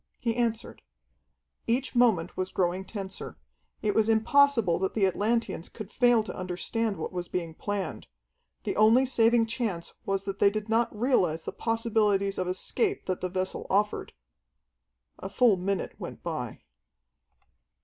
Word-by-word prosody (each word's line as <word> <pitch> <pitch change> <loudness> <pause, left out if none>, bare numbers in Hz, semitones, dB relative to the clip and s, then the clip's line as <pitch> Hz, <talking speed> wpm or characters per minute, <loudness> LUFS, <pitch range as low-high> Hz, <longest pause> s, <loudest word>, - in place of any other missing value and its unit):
He 230 -3 -1
answered. 235 -1 -2 0.9
Each 250 +4 0
moment 220 -9 +3
was 185 0 -2
growing 185 +1 -1
tenser. 195 -1 -7 0.5
It 210 -1 +1
was 220 0 +2
impossible 230 -4 +4
that 190 0 -2
the 210 -3 +3
Atlanteans 210 -1 -1
could 215 -2 -9
fail 240 -3 +4
to 195 - -7
understand 195 +4 -2
what - - -4
was 175 -1 -4
being 170 -3 -3
planned. 205 +3 -4 0.6
The - - -2
only 225 +5 +6
saving 235 -2 +3
chance 225 -7 -3
was 195 0 -1
that 195 0 -5
they 200 - +6
did 215 +1 -4
not 230 +1 +2
realize 180 - +2
the - - -4
possibilities 215 -4 0
of 185 - -1
escape 390 - -1
that 185 - -2
the 185 - -2
vessel 185 +1 -3
offered. 210 +2 0 1.1
A 190 - -6
full 235 0 +4
minute 190 +1 -2
went - - -8
by. - - -4
210 Hz, 150 wpm, -28 LUFS, 185-230 Hz, 1.1 s, only